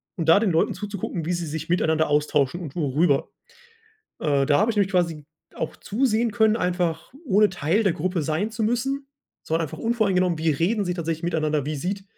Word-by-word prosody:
und 165 -5 -1
da 165 - +7
den 215 -2 +1
Leuten 165 - +2
zuzugucken, 200 -4 -5
wie 175 - -1
sie 175 -1 -2
sich 160 +1 -5
miteinander 160 -3 +2
austauschen 150 +1 +1
und 150 -6 -8
worüber. 145 -2 +1 0.9
Äh, 140 -3 +1
da 145 0 +3
habe 215 +3 +3
ich 220 - -4
nämlich 200 -1 +1
quasi 170 -5 0 0.3
auch - - -4
zusehen 235 0 0
können, 220 0 +3
einfach 180 -3 -1
ohne 210 -2 +4
Teil 175 +4 0
der 195 -5 +2
Gruppe 175 +1 -2
sein 160 +9 -1
zu 225 0 -4
müssen. 265 +5 -1 0.4
Es - - -18
war 165 +1 +2
einfach 160 -3 -4
unvoreingenommen, 195 -7 +1
wie 160 0 +1
reden 195 +9 0
sie 180 - -1
tatsächlich 165 -1 -3
miteinander? 155 -4 0
Wie 155 0 -2
sieht 195 +6 -3
175 Hz, 195 wpm, -24 LUFS, 155-205 Hz, 0.9 s, da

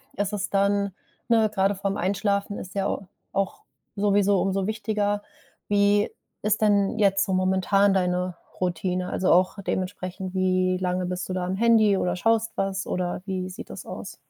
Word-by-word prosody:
ist 205 +1 -1
es 200 -1 -2
dann 200 -1 +1 0.4
ne, 220 -2 +4
grade 195 0 +2
vor 195 0 -2
’m - - -3
Einschlafen 200 +2 0
ist 185 - -9
ja 195 -1 0
au 195 - -4 0.3
auch 195 -1 -2 0.3
sowieso 200 -1 +3
umso 195 0 0
wichtiger. 210 -1 -1 0.5
Wie 205 0 +3 0.3
ist 210 0 +1
denn 205 0 +3
jetzt 195 -1 +3
so 190 - -2
momentan 190 +2 +3
deine 180 -1 0 0.3
Routine? 180 +1 -1
Also, 185 - +1
auch 185 +3 +3
dementsprechend, 185 0 -3
wie 185 0 +2
lange 180 0 -1
bist 180 0 -3
du - - -2
da 185 -1 -1
am 185 +1 -2
Handy 220 -3 +4
oder 180 - 0
schaust 225 +2 +1
was, 195 0 -1
oder 180 0 -2
wie 185 -2 -3
sieht 180 - -9
das - - -8
aus? - - -8
195 Hz, 170 wpm, -25 LUFS, 185-205 Hz, 0.5 s, ne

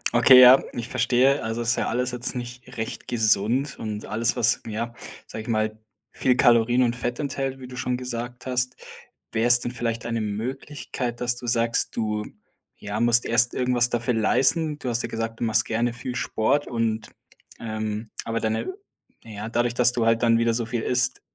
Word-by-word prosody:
Okay, 125 +2 +8
ja, 130 +1 +9
ich 120 0 -6
verstehe. 130 +3 +2
Also, 115 +1 -3
das 115 - -1
ist - - +3
ja - - -2
alles 125 +2 -1
jetzt 125 +1 0
nicht 125 0 -8
recht 110 - -6
gesund 115 +4 +1
und 105 -1 -5
alles, 115 +3 0
was 120 0 +2
ja, 115 +2 -4 0.3
sag 110 - -8
ich 110 - -12
mal, 110 -1 -1 0.3
viel 125 -1 +1
Kalorien 120 +1 +4
und 120 0 0
Fett 120 0 -4
enthält, 135 -2 -3
wie 125 - -9
du 125 - -10
schon 125 -1 -2
gesagt 120 0 -5
hast. 125 0 -1 0.6
Wäre 110 +2 +1
es 120 0 +7
denn 120 - -4
vielleicht 115 -1 -4
eine 115 -1 -2
Möglichkeit, 120 +3 -5
dass 125 0 +1
du 120 - -9
sagst, 115 0 +1
du, 105 -2 -2 0.5
ja 105 +1 -5
musst 120 0 +5
erst 115 +1 +3
irgendwas 125 -1 +3
dafür 120 +1 -1
leisten. 145 +7 +2
Du 125 - -5
hast 120 0 +1
ja 115 - -5
gesagt, 115 0 -5
du - - -3
machst 110 - +3
gerne 115 +1 -1
viel 125 +1 -6
Sport 125 +5 0
und 115 -2 -2 0.5
ähm 110 -1 -5
aber 115 0 -2
deine 110 - -2 0.5
na 115 - -11
ja, 105 +2 -6
dadurch, 120 0 0
dass 125 0 +4
du 115 -2 0
halt 115 +1 +2
dann 115 -1 +4
wieder 115 0 +1
so 115 0 -1
viel 115 -1 -3
isst, 125 +1 +1
120 Hz, 195 wpm, -24 LUFS, 115-125 Hz, 0.6 s, ja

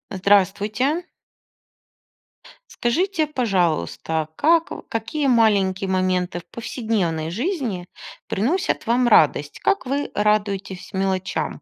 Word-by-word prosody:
Здравствуйте. 205 - +1 1.7
Скажите, 320 +6 0
пожалуйста, 170 - -1
как 330 - +3 0.2
какие 275 +6 -2
маленькие 200 -6 +2
моменты 185 -2 0
в 170 - -16
повседневной 210 -10 -2
жизни 230 - -3 0.4
приносят 285 - 0
вам 240 +2 +3
радость? 150 -8 +3
Как 395 - +1
вы 280 +3 -2
радуетесь 205 -3 -1
мелочам? 190 -4 -2
205 Hz, 90 wpm, -22 LUFS, 185-255 Hz, 1.7 s, как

